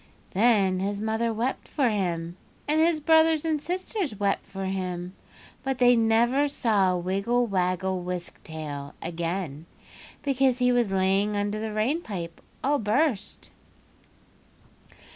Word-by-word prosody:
"Then 195 -3 +3
his 200 +1 -2
mother 220 +2 0
wept 235 +4 -2
for 275 -4 +1
him, 175 -5 -2 0.3
and 305 +2 +2
his 330 -1 +3
brothers 320 0 +4
and 310 -2 0
sisters 360 - -2
wept 200 -1 0
for 195 -1 -5
him, 185 -1 -3 0.5
but 270 -1 -2
they 245 -1 +6
never 235 +5 +3
saw 205 -9 +2
Wiggle 200 +7 0
Waggle 185 -2 0
Wisk 180 0 -5
Tail 145 -3 -7
again, 170 -2 -4 0.6
because 270 -2 +2
he 250 -1 +3
was 240 -4 +2
lying 195 +2 +1
under 205 +1 -1
the 220 0 -3
rain 230 +10 0
pipe 170 - -6 0.2
all 285 +1 +2
burst." 225 +1 -1
210 Hz, 130 wpm, -26 LUFS, 185-255 Hz, 0.6 s, they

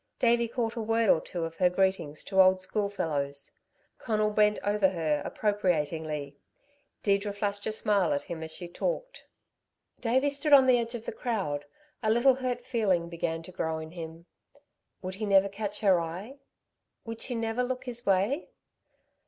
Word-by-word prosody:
Davey 235 -1 +3
caught 230 -1 -2
a 230 - -2
word 225 0 +3
or 160 - +3
two 175 -2 -5
of 165 0 -4
her 180 -1 +4
greetings 180 -5 0
to 190 -1 +4
old 185 0 +5
schoolfellows. 160 -8 -2 0.5
Conal 215 -2 0
bent 210 0 +3
over 205 -1 +3
her 160 -5 0
appropriatingly. 160 -8 -1 0.7
Deirdre 200 0 +1
flashed 205 0 -2
a - - 0
smile 205 -5 +2
at 140 - 0
him 165 -2 -6
as 160 - -5
she 175 +2 -6
talked. - - -3 0.8
Davey 260 +4 +2
stood 290 +1 +1
on 270 -2 +9
the 255 -2 +5
edge 235 +1 -3
of 230 -1 -7
the - - -3
crowd. 195 -12 -2 0.4
A 220 - +1
little 240 +4 +5
hurt 250 -2 -3
feeling 195 -9 +1
began 165 -1 -3
to 185 - -10
grow 160 -3 -2
in 160 0 -7
him. 165 -1 -8 0.8
Would 185 +1 -4
he 215 +3 -4
never 195 0 +5
catch 205 +1 -5
her 190 -4 +5
eye? 190 +12 -6 0.7
Would 225 0 -6
she 250 - -3
never 225 +1 -1
look 250 0 -2
his 240 -2 -5
way? 200 - +1
200 Hz, 170 wpm, -29 LUFS, 170-230 Hz, 0.8 s, on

